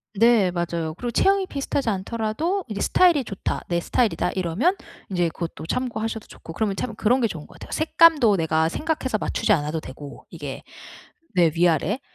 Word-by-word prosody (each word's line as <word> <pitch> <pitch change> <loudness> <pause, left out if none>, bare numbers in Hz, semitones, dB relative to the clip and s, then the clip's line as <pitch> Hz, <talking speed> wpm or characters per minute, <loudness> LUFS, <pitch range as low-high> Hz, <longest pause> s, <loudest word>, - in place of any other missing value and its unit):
네 225 -3 +4
맞아요. 170 -2 -3
그리고 240 +6 -4
체형이 390 - +3
비슷하지 275 -3 -2
않더라도 230 - -2
'이제 210 -3 -5
스타일이 345 -7 +4
좋다. 200 -4 -4
내 170 -1 +1
스타일이다.' 230 +5 0
이러면 190 - +1 0.4
이제 175 -2 +1
그것도 165 -1 -6
참고하셔도 225 -1 -3
좋고 165 - -11
그러면 200 +1 -1
참 220 +2 -4
그런 245 +5 +2
게 230 - +3
좋은 160 -7 -7
것 - - -17
같아요. - - -11
색감도 310 -9 +4
내가 160 -1 +1
생각해서 295 - -1
맞추지 215 - -1
않아도 155 -2 -1
되고 145 -1 -10
이게. 145 -5 -7 0.7
네 170 -3 +4
위아래. 175 - +2
210 Hz, 410 characters per minute, -23 LUFS, 170-250 Hz, 0.7 s, 네